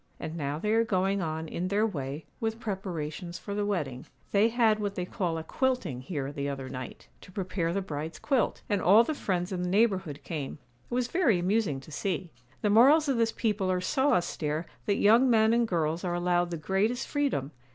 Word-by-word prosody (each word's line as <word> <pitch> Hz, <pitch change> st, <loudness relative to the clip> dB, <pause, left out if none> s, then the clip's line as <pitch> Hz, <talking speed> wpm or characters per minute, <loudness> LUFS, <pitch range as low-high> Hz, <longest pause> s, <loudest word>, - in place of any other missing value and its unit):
And 160 Hz, -, -5 dB
now 145 Hz, -2 st, -2 dB
they 210 Hz, +7 st, -1 dB
are 225 Hz, +1 st, +4 dB
going 195 Hz, -2 st, +1 dB
on, 160 Hz, -1 st, -3 dB
in 175 Hz, +3 st, -3 dB
their 205 Hz, +3 st, +2 dB
way, 145 Hz, -6 st, -4 dB
with 225 Hz, 0 st, -2 dB
preparations 175 Hz, -5 st, -4 dB
for 200 Hz, -, -6 dB
the 205 Hz, 0 st, -1 dB
wedding. 145 Hz, -11 st, -3 dB, 0.2 s
They 210 Hz, +3 st, +4 dB
had 225 Hz, -2 st, +3 dB
what 205 Hz, -1 st, -2 dB
they 180 Hz, -, -2 dB
call 175 Hz, -3 st, -2 dB
"a 160 Hz, -, -4 dB
quilting" 200 Hz, -, -1 dB
here 140 Hz, -1 st, -4 dB
the 140 Hz, 0 st, -3 dB
other 135 Hz, -2 st, -5 dB
night, 130 Hz, -2 st, -8 dB
to -, -, -14 dB
prepare 185 Hz, -3 st, -2 dB
the 195 Hz, +2 st, -1 dB
bride's 155 Hz, -2 st, -5 dB
quilt, 270 Hz, -4 st, 0 dB
and 205 Hz, -3 st, 0 dB
all 210 Hz, +6 st, +7 dB
the 310 Hz, -, -2 dB
friends 185 Hz, -8 st, -2 dB
in 180 Hz, -1 st, -2 dB
the 180 Hz, -, -1 dB
neighbourhood 190 Hz, -7 st, +1 dB
came—it 150 Hz, -4 st, -4 dB, 0.3 s
was 245 Hz, 0 st, +1 dB
very 290 Hz, -, +3 dB
amusing 180 Hz, -5 st, +1 dB
to 155 Hz, -, -14 dB
see. 180 Hz, +2 st, -3 dB, 0.3 s
The 210 Hz, -, +3 dB
morals 280 Hz, +8 st, +6 dB
of 265 Hz, -, +2 dB
this 230 Hz, -1 st, +2 dB
people 210 Hz, -5 st, 0 dB
are 180 Hz, -, +1 dB
so 265 Hz, +10 st, +2 dB
austere 160 Hz, -2 st, -1 dB, 0.2 s
that 200 Hz, -, +3 dB
young 230 Hz, +7 st, +5 dB
men 220 Hz, -1 st, +4 dB
and 235 Hz, 0 st, +3 dB
girls 165 Hz, -3 st, 0 dB
are 175 Hz, -1 st, -1 dB
allowed 175 Hz, 0 st, +1 dB
the 170 Hz, -, -3 dB
greatest 195 Hz, -, 0 dB
freedom. 275 Hz, -, -1 dB
185 Hz, 205 wpm, -29 LUFS, 160-220 Hz, 0.3 s, all